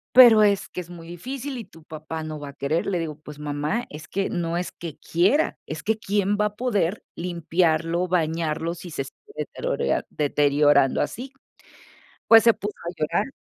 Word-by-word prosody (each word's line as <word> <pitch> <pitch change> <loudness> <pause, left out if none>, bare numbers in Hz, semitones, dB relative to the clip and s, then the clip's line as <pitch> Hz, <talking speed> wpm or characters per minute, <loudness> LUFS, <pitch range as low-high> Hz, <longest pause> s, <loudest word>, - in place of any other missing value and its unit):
"Pero 230 -4 +9
es 200 -1 +2
que - - -6
es 175 -1 -7
muy 170 -1 -10
difícil 260 - -5
y 225 - -6
tu 165 -4 -17
papá 155 0 -6
no 155 -1 -5
va 145 - -7
a - - -11
querer", 140 +4 -1
le 180 -3 0
digo: 155 -2 -4
"Pues 150 -1 -11
mamá, 150 +10 -2
es 150 +1 -9
que 195 0 -1
no 170 -1 -2
es 175 +1 -2
que 165 -4 -8
quiera, 195 - +1
es 155 0 -6
que, 220 +1 +1
¿quién 205 -1 0
va 210 - +3
a 210 0 -2
poder 210 -6 0
limpiarlo, 170 0 0
bañarlo, 165 -1 0
si 175 -1 -9
se 135 - -2
sigue 420 - -16
deterorea - - -1
deteriorando 145 -1 +3
así?". 255 - -4 0.9
Pues 225 0 +8
se 230 - +7
puso 205 0 -5
a - - -1
llorar 155 +8 0
170 Hz, 190 wpm, -24 LUFS, 155-210 Hz, 0.9 s, Pero